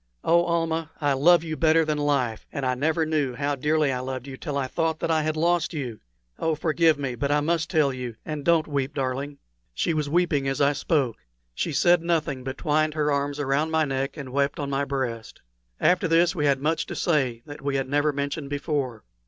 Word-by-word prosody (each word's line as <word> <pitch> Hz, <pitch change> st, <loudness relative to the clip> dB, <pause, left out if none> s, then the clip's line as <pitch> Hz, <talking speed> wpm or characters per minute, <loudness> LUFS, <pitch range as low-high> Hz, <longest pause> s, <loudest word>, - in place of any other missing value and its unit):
Oh, 170 Hz, +1 st, +4 dB
Almah, 165 Hz, -1 st, 0 dB
I 145 Hz, -2 st, +2 dB
love 170 Hz, +5 st, +5 dB
you 160 Hz, -1 st, -4 dB
better 160 Hz, +1 st, +3 dB
than 150 Hz, -1 st, -1 dB
life 135 Hz, -7 st, 0 dB
and 140 Hz, -3 st, -3 dB
I 130 Hz, -, +2 dB
never 160 Hz, +5 st, +1 dB
knew 150 Hz, -5 st, 0 dB
how 145 Hz, +2 st, -1 dB
dearly 150 Hz, +1 st, +1 dB
I 125 Hz, -, -2 dB
loved 130 Hz, 0 st, -5 dB
you 135 Hz, -1 st, -7 dB
till 145 Hz, +1 st, -4 dB
I 140 Hz, -, 0 dB
thought 160 Hz, +4 st, -1 dB
that -, -, -1 dB
I 160 Hz, -1 st, +3 dB
had 155 Hz, 0 st, -1 dB
lost 170 Hz, +1 st, +1 dB
you! 125 Hz, -7 st, -4 dB, 0.4 s
Oh, 160 Hz, -1 st, +1 dB
forgive 160 Hz, 0 st, +2 dB
me, 135 Hz, -3 st, -3 dB
but 140 Hz, +4 st, -2 dB
I 145 Hz, -, +3 dB
must 160 Hz, +1 st, 0 dB
tell 150 Hz, -6 st, +2 dB
you 125 Hz, -3 st, -5 dB
and 150 Hz, -2 st, -4 dB
don't 165 Hz, -1 st, +3 dB
weep, 140 Hz, -2 st, -2 dB
darling." 135 Hz, +1 st, -3 dB, 0.4 s
She 165 Hz, -, 0 dB
was 150 Hz, -2 st, -1 dB
weeping 155 Hz, -4 st, +1 dB
as 135 Hz, -1 st, -1 dB
I 145 Hz, +1 st, +4 dB
spoke. 140 Hz, -5 st, 0 dB, 0.4 s
She 160 Hz, -, -2 dB
said 175 Hz, +3 st, +4 dB
nothing, 160 Hz, -6 st, -1 dB
but 130 Hz, +1 st, -5 dB
twined 155 Hz, -1 st, +1 dB
her 150 Hz, -1 st, +1 dB
arms 140 Hz, +1 st, -1 dB
around 145 Hz, +2 st, +1 dB
my 160 Hz, -1 st, +2 dB
neck 135 Hz, +1 st, -2 dB
and 140 Hz, -3 st, -6 dB
wept 140 Hz, +1 st, 0 dB
on 140 Hz, -1 st, -3 dB
my 140 Hz, +1 st, 0 dB
breast. 130 Hz, -5 st, -4 dB, 0.4 s
After 180 Hz, 0 st, +3 dB
this 165 Hz, +1 st, +3 dB
we 150 Hz, -5 st, 0 dB
had 140 Hz, -1 st, +2 dB
much 160 Hz, +1 st, 0 dB
to -, -, -5 dB
say 130 Hz, -9 st, 0 dB
that 145 Hz, 0 st, -10 dB
we 140 Hz, 0 st, -1 dB
had 135 Hz, -1 st, -1 dB
never 145 Hz, +2 st, +2 dB
mentioned 140 Hz, 0 st, -3 dB
before. 140 Hz, -5 st, -2 dB
145 Hz, 220 wpm, -25 LUFS, 135-160 Hz, 0.4 s, love